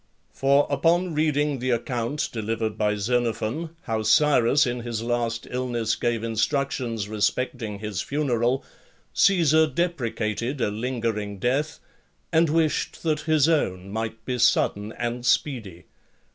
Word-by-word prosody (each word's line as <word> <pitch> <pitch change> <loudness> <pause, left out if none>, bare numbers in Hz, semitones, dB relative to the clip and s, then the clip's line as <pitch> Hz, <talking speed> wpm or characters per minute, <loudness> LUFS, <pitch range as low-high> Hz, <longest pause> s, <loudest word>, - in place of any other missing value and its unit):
For, 140 +1 +3
upon 170 +5 +2
reading 150 -2 +1
the 130 +1 -2
account 120 +3 -1
delivered 110 -1 -2
by 105 -1 +1
Xenophon, 120 +8 -1
how 110 -1 -1
Cyrus 135 +4 +4
in 125 0 -2
his 115 -2 -4
last 115 -1 -1
illness 120 -3 -1
gave 120 -2 -1
instructions 115 -1 -1
respecting 110 +1 -1
his 105 -3 -4
funeral, 130 -3 0 0.5
Caesar 160 -5 +4
deprecated 130 -5 -2
a 105 - 0
lingering 110 -3 -3
death, 135 +8 -1 0.5
and 165 0 +4
wished 160 0 0
that 155 -2 +1
his 155 -2 +4
own 100 - 0
might 110 +1 -4
be 125 -1 -2
sudden 105 -3 +2
and 120 0 -3
speedy. 115 - 0
120 Hz, 125 wpm, -25 LUFS, 110-145 Hz, 0.5 s, Cyrus